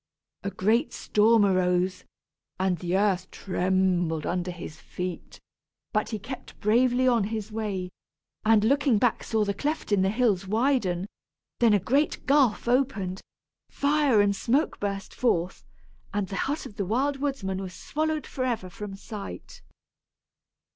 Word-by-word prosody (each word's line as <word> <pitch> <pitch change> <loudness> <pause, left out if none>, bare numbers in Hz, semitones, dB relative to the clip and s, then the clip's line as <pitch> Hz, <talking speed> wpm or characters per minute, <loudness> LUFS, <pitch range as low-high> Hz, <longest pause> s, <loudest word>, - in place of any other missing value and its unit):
A 200 - -2
great 220 +9 +1
storm 215 0 +4
arose, 185 -1 +1 0.5
and 185 -2 +1
the 180 +1 0
earth 190 -2 +1
trembled 180 -4 0
under 180 0 -1
his 170 -3 -8
feet; 180 -1 -6 0.5
but 215 -1 +1
he 220 - -2
kept 255 +6 -9
bravely 245 +4 +3
on 235 -5 +3
his 215 0 -4
way, 200 -4 -3 0.5
and 215 -1 +4
looking 275 0 +3
back 230 +2 +1
saw 220 -2 +1
the 200 - 0
cleft 295 +5 -3
in 200 -2 +4
the 190 - +3
hills 210 -4 +1
widen; 215 -5 +1 0.5
then 230 -3 +5
a - - +3
great 275 - 0
gulf 270 -5 +3
opened, 240 -8 0 0.5
fire 280 -6 +3
and 200 0 +2
smoke 270 +10 0
burst 200 -1 -3
forth, 180 -7 0 0.5
and 205 -2 -2
the 195 - -4
hut 295 +3 -2
of 205 - -11
the 200 - -1
Wild 270 +7 +1
Woodsman 240 -10 -2
was 185 -2 -7
swallowed 310 -1 -2
forever 240 -8 -3
from 210 0 -7
sight. 195 - -8
210 Hz, 145 wpm, -27 LUFS, 185-250 Hz, 0.5 s, then